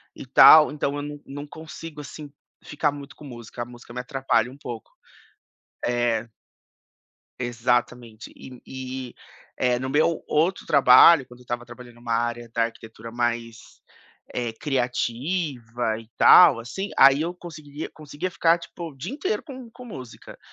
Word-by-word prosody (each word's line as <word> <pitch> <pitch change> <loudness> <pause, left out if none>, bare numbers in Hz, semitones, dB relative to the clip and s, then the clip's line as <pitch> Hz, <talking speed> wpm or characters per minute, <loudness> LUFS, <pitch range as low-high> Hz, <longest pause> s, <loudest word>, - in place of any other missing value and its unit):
e - - -9
tal. 150 +4 +8
Então 145 -1 -2
eu - - -3
não 145 0 -7
não 145 +1 -8
consigo 160 0 -10
assim 145 +1 -10 0.3
ficar 150 0 -1
muito 140 0 -10
com 150 - -13
música. 120 -2 -9
A - - -3
música 120 0 -14
me 125 - -4
atrapalha 125 -3 0
um 135 - -14
pouco 120 -6 -8 0.9
eh. 120 -1 0 1.1
Exatamente. 120 -1 -2
E 130 -2 -12
e, 130 -1 -7 0.4
eh, 125 -1 +1
no 130 - -4
meu 155 +4 +1
outro 165 +5 0
trabalho, 140 +2 +7
quando 125 0 -15
eu 125 - -16
estava 120 0 -5
trabalhando 120 0 -13
numa 120 -1 -4
área 120 0 -2
da 115 - +2
arquitetura 115 0 -8
mais, 120 -1 -4 0.5
eh, 120 -2 -3
criativa 125 -2 -2
e 115 - -14
tal, 165 -9 +8
assim, 190 - -5
aí 135 +2 +7
eu 170 +2 -2
conseguiria 155 -4 -9
conseguia 155 +4 -6
ficar, 165 0 +3
tipo, 170 0 -8
o - - -19
dia 175 - -6
inteiro 380 +9 -2
com 260 -5 -10
com 250 +2 -12
música. 130 - -11
130 Hz, 155 wpm, -24 LUFS, 120-150 Hz, 1.1 s, tal